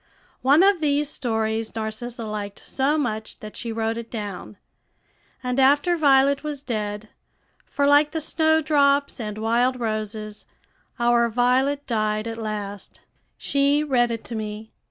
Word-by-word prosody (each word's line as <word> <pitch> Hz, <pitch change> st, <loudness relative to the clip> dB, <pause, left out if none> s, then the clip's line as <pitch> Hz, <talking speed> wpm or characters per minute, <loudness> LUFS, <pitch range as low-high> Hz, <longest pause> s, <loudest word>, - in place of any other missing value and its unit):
One 285 Hz, +7 st, +5 dB
of 390 Hz, -3 st, +4 dB
these 290 Hz, -1 st, +1 dB
stories 225 Hz, -3 st, -2 dB
Narcissa 225 Hz, +2 st, -5 dB
liked 205 Hz, -2 st, -6 dB
so 280 Hz, +3 st, +1 dB
much 220 Hz, -7 st, -3 dB
that 215 Hz, 0 st, -10 dB
she 235 Hz, -, -4 dB
wrote 225 Hz, 0 st, -2 dB
it 235 Hz, 0 st, -7 dB
down, 205 Hz, -3 st, -6 dB, 0.9 s
and 250 Hz, +1 st, -1 dB
after 290 Hz, +6 st, +4 dB
Violet 280 Hz, -2 st, +4 dB
was 295 Hz, -2 st, -5 dB
dead, 210 Hz, -3 st, -4 dB, 0.6 s
for, 285 Hz, -, 0 dB
like 290 Hz, +1 st, +5 dB
the 320 Hz, -, -3 dB
snowdrops 300 Hz, -3 st, +2 dB
and 210 Hz, -2 st, -5 dB
wild 240 Hz, +3 st, +1 dB
roses, 215 Hz, -2 st, -4 dB, 0.5 s
our 235 Hz, 0 st, +3 dB
Violet 255 Hz, +5 st, +1 dB
died 215 Hz, -2 st, -1 dB
at 225 Hz, 0 st, -5 dB
last, 205 Hz, -2 st, -6 dB, 0.4 s
she 280 Hz, +1 st, +1 dB
read 250 Hz, -5 st, +2 dB
it 230 Hz, -1 st, -4 dB
to -, -, -8 dB
me. 215 Hz, 0 st, -6 dB
240 Hz, 140 wpm, -23 LUFS, 220-280 Hz, 0.9 s, One